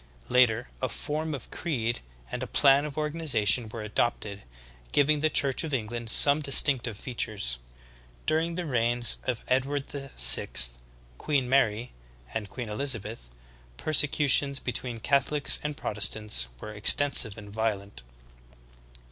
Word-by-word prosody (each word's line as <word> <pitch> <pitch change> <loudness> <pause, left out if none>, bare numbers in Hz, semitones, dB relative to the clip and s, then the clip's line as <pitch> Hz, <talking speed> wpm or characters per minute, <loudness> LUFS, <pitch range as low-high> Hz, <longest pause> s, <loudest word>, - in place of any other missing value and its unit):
Later 120 -1 +1
a 130 - -2
form 155 +6 -5
of 135 - -12
creed 120 -8 -4 0.3
and - - -6
a - - -5
plan 140 0 +2
of 150 -1 -9
organization 140 -8 0
were 110 0 -9
adopt 110 +3 -3
ed, 100 -1 -9 0.5
giving 150 +1 +1
the 155 +2 0
Church 140 -2 +1
of 155 -4 -4
England 115 0 -6
some 145 +6 +6
distinctive 135 -5 +4
features. 105 - -3 0.7
During 165 +2 0
the 180 0 -5
reigns 120 -3 +3
of 125 -3 -4
Edward 135 +2 -2
VI, 135 - +1 0.7
Queen 140 -4 -2
Mary, 125 -3 -1 0.4
and 105 -3 -6
Queen 120 +2 -8
Elizabeth, 110 - -3 0.5
persecutions 145 - +1
between 125 -1 -3
Catholics 140 +2 0
and 150 -1 -6
Protestants 105 - 0
were 105 - -10
extensive 110 0 +6
and 105 -1 -12
violent. 105 -2 -5
125 Hz, 130 wpm, -25 LUFS, 110-145 Hz, 0.7 s, some